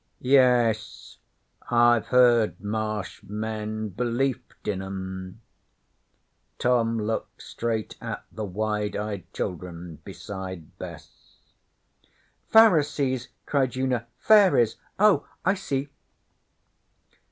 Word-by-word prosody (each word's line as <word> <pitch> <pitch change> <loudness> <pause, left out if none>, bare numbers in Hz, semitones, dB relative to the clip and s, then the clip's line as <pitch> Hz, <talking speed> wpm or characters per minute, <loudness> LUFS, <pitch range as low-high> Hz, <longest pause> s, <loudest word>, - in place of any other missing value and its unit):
'Yes. 125 -4 +2 0.5
I've 120 -1 +4
heard 120 -6 +4
Marsh 105 -1 -3
men 110 0 -4
belieft 125 +4 -2
in 95 -2 -1
'em.' 95 +1 -6 1.2
Tom 115 -2 +2
looked 110 +1 -3
straight 115 -2 -3
at - - -5
the 110 - -5
wide 105 +1 -2
eyed 100 -4 -4
children 90 -2 -5
beside 95 -4 -8
Bess. 80 -4 -11 1.1
'Pharisees,' 145 - +4 0.2
cried 135 -3 0
Una. 125 -3 -1
'Fairies? 190 - +5 0.2
Oh, 210 -1 +4 0.2
I 190 - +4
see!' 140 -8 -3
110 Hz, 85 wpm, -26 LUFS, 100-125 Hz, 1.2 s, Fairies